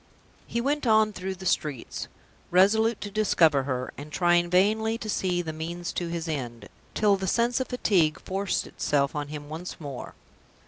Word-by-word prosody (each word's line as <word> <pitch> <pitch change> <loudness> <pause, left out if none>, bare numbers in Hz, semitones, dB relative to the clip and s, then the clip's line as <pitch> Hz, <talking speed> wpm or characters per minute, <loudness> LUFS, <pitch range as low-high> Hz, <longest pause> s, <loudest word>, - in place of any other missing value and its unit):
He 235 - -2
went 285 +1 0
on 215 -1 +4
through 190 0 -4
the 190 +1 -10
streets, 150 -8 -2 0.4
resolute 215 +5 +4
to 205 - -5
discover 165 -9 +3
her, 130 -2 -2
and 150 +1 -9
trying 175 0 +3
vainly 215 +5 +2
to 225 - -7
see 180 -4 0
the 160 -2 -5
means 170 +2 -5
to 175 - -2
his 170 -1 -4
end, 120 -8 -5 0.3
till 205 -2 +4
the 190 0 -3
sense 235 +5 +2
of 260 - -2
fatigue 185 -11 +2
forced 195 0 -2
itself 140 -1 0
on 145 -1 -2
him 145 0 -7
once 160 +4 -7
more. 140 -5 -7
180 Hz, 175 wpm, -27 LUFS, 155-215 Hz, 0.4 s, on